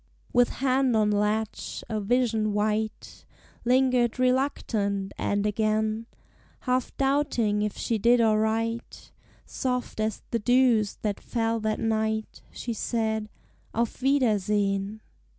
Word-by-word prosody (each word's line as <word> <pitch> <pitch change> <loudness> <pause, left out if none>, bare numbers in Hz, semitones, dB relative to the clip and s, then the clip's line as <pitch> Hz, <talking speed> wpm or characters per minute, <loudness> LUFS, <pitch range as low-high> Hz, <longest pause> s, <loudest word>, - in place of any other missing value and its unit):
With 245 0 +4 0.2
hand 260 -2 +3
on 210 -1 +3
latch, 210 +1 -1
a 215 - -2
vision 220 -1 +1
white 215 +1 -2 0.4
Lingered 250 -1 +3
reluctant, 235 -7 0
and 205 0 -1
again 215 +1 0 0.5
Half 255 -1 -1
doubting 270 -7 +1
if 210 -1 -2
she 225 -2 -1
did 240 +3 +4
aright, 225 +1 0 0.3
Soft 250 -3 -3
as 215 -1 -2
the 230 - +1
dews 245 -3 +3
that 205 -2 -1
fell 230 -1 -1
that 215 0 -1
night, 220 -1 -1
She 235 - -4
said, 220 -1 -1 0.5
"Auf 235 +2 -1
wiedersehen!" 210 -5 +1
220 Hz, 115 wpm, -26 LUFS, 215-245 Hz, 0.5 s, With